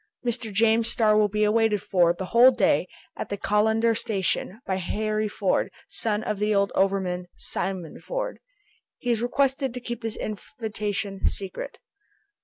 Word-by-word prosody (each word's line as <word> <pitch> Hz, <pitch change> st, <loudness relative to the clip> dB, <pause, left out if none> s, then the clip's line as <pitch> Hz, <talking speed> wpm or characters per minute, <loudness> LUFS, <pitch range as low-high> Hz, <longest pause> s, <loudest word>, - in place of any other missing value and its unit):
"Mr. 235 Hz, -2 st, -1 dB
James 225 Hz, +2 st, +3 dB
Starr 215 Hz, -2 st, +3 dB
will 210 Hz, 0 st, +4 dB
be 210 Hz, +1 st, 0 dB
awaited 210 Hz, 0 st, +3 dB
for, 175 Hz, -3 st, +3 dB
the 180 Hz, +2 st, -4 dB
whole 235 Hz, +6 st, +7 dB
day, 260 Hz, -, +2 dB, 0.3 s
at -, -, -5 dB
the 200 Hz, -, -3 dB
Callander 220 Hz, +3 st, +2 dB
station, 200 Hz, -1 st, -1 dB
by 190 Hz, -, -1 dB
Harry 215 Hz, +3 st, -1 dB
Ford, 200 Hz, -2 st, 0 dB, 0.2 s
son 215 Hz, -1 st, -1 dB
of 210 Hz, -2 st, -2 dB
the 210 Hz, 0 st, +1 dB
old 200 Hz, 0 st, +2 dB
overman 190 Hz, -2 st, 0 dB
Simon 185 Hz, -5 st, -3 dB
Ford." -, -, -4 dB, 0.6 s
"He 245 Hz, -, -1 dB
is 230 Hz, -1 st, +1 dB
requested 265 Hz, +1 st, +1 dB
to -, -, -3 dB
keep 240 Hz, -1 st, -6 dB
this 225 Hz, -2 st, -4 dB
invitation 210 Hz, -3 st, -3 dB
secret." 205 Hz, -, -4 dB
215 Hz, 155 wpm, -25 LUFS, 195-230 Hz, 0.6 s, whole